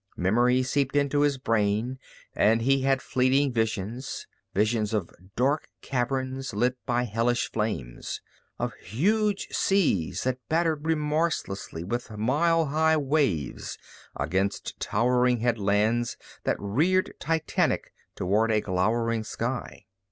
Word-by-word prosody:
Memory 120 Hz, +7 st, +3 dB
seeped 135 Hz, +1 st, 0 dB
into 145 Hz, 0 st, +2 dB
his 145 Hz, -2 st, +2 dB
brain 115 Hz, +1 st, 0 dB, 0.3 s
and 115 Hz, +2 st, +3 dB
he 135 Hz, +2 st, +3 dB
had 135 Hz, 0 st, +1 dB
fleeting 130 Hz, +1 st, +2 dB
visions, 110 Hz, +3 st, -2 dB, 0.3 s
visions 110 Hz, +1 st, +1 dB
of 100 Hz, -5 st, -2 dB, 0.2 s
dark 140 Hz, +5 st, +1 dB, 0.2 s
caverns 130 Hz, -1 st, -2 dB
lit 125 Hz, +4 st, +2 dB
by 120 Hz, 0 st, +1 dB
hellish 120 Hz, +1 st, 0 dB
flames, 105 Hz, -, -3 dB, 0.4 s
of -, -, -2 dB
huge 200 Hz, -, 0 dB
seas 170 Hz, -, +1 dB
that 130 Hz, 0 st, -1 dB
battered 160 Hz, -2 st, +1 dB
remorselessly 150 Hz, -, -1 dB
with 120 Hz, +7 st, -3 dB
mile 150 Hz, +10 st, +2 dB
high 160 Hz, +2 st, +3 dB
waves 135 Hz, -, 0 dB, 0.4 s
against 95 Hz, +2 st, -2 dB
towering 125 Hz, +1 st, +2 dB
headlands 115 Hz, 0 st, +1 dB, 0.3 s
that -, -, +1 dB
reared 160 Hz, -, +1 dB
titanic 160 Hz, -1 st, 0 dB, 0.2 s
toward 105 Hz, +5 st, +1 dB
a 110 Hz, -, +3 dB
glowering 110 Hz, +4 st, 0 dB
sky. 120 Hz, +3 st, -4 dB
125 Hz, 115 wpm, -27 LUFS, 110-145 Hz, 0.4 s, Memory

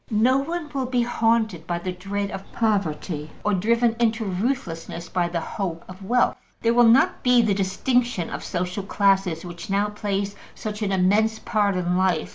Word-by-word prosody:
No 245 Hz, +4 st, +3 dB
one 330 Hz, +3 st, -3 dB
will 265 Hz, -2 st, -1 dB
be 250 Hz, -1 st, +1 dB
haunted 225 Hz, -7 st, +1 dB
by 175 Hz, -, -1 dB
the 180 Hz, +2 st, -4 dB
dread 200 Hz, +2 st, -4 dB
of 195 Hz, 0 st, -8 dB
poverty 175 Hz, -8 st, -1 dB
or 210 Hz, -, +1 dB
driven 230 Hz, +4 st, +2 dB
into 225 Hz, -1 st, +1 dB
ruthlessness 180 Hz, -5 st, -3 dB
by 175 Hz, -2 st, 0 dB
the 170 Hz, 0 st, -2 dB
hope 170 Hz, 0 st, -4 dB
of 185 Hz, +1 st, -11 dB
wealth. 245 Hz, +6 st, +2 dB, 0.2 s
There 230 Hz, 0 st, +2 dB
will 240 Hz, 0 st, +6 dB
not 240 Hz, +4 st, +4 dB
be 250 Hz, -1 st, +5 dB
the 215 Hz, -2 st, +2 dB
distinction 200 Hz, +1 st, 0 dB
of -, -, -5 dB
social 180 Hz, +2 st, -3 dB
classes 195 Hz, -4 st, +1 dB
which 175 Hz, +4 st, -8 dB
now 200 Hz, +1 st, +1 dB
plays 200 Hz, -1 st, -2 dB, 0.2 s
such 210 Hz, 0 st, -5 dB
an 205 Hz, -2 st, 0 dB
immense 205 Hz, +4 st, +2 dB
part 210 Hz, -4 st, 0 dB
in 180 Hz, -1 st, 0 dB
life. 185 Hz, -4 st, +1 dB
200 Hz, 180 wpm, -24 LUFS, 180-230 Hz, 0.2 s, will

